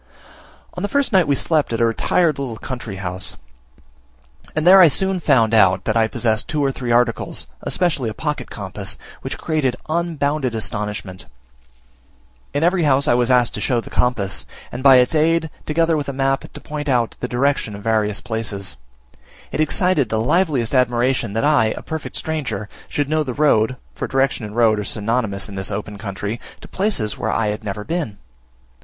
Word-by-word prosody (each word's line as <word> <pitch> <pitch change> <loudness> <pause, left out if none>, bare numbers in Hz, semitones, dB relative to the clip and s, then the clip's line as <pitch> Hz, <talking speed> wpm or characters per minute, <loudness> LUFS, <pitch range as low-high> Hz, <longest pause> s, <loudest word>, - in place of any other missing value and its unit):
On 180 - -6
the 205 - -1
first 280 -2 0
night 185 -4 +4
we 140 - +3
slept 155 -1 0
at 115 - -1
a 115 - +4
retired 150 +7 +1
little 125 -5 -4
country 120 -4 -6
house; 95 -1 -3 1.2
and 155 0 0
there 190 +2 +9
I 175 - +9
soon 190 +4 +1
found 115 -8 +3
out 95 -4 +5
that 110 - 0
I 115 -1 +3
possessed 110 -1 -1
two 150 -2 0
or 135 - +2
three 125 -2 -5
articles, 120 0 +1 0.2
especially 150 -10 0
a - - -5
pocket - - -3
compass, - - -5 0.2
which - - -5
created 145 -6 0
unbounded 155 -6 -1
astonishment. 105 -3 -3 1.2
In 145 - -1
every 175 +1 +3
house 140 -2 +3
I - - +5
was 120 0 +2
asked 125 -2 +3
to - - -4
show 120 -2 +1
the - - -9
compass, 110 -6 0 0.2
and - - -5
by 135 -1 +8
its 125 +3 +4
aid, 160 0 +2 0.2
together 165 +1 +2
with 145 -2 -2
a - - -3
map, 135 0 -1
to - - -10
point 150 -1 -5
out 120 -3 +1
the 125 - -3
direction 125 -4 0
of 100 - -10
various 105 -2 0
places. 105 - -4 0.7
It - - -1
excited 155 - +2
the 110 - 0
liveliest 135 -2 +1
admiration 125 -3 +1
that 115 - 0
I, 145 -7 +3
a - - -7
perfect 160 -2 -6
stranger, 125 -11 -3 0.2
should 145 -1 -1
know 155 +1 +1
the 130 -5 -3
road 130 -5 +3 0.2
(for - - -4
direction 135 -3 0
and 105 0 -8
road 115 -3 +4
are - - -2
synonymous 105 -1 -1
in 100 - -9
this 95 0 -2
open 105 0 -5
country) 100 +2 -4 0.2
to - - -11
places 185 - -1
where - - -1
I 110 -2 +1
had 105 +1 -4
never 105 0 -4
been. 155 - -3
125 Hz, 185 wpm, -20 LUFS, 110-150 Hz, 1.2 s, there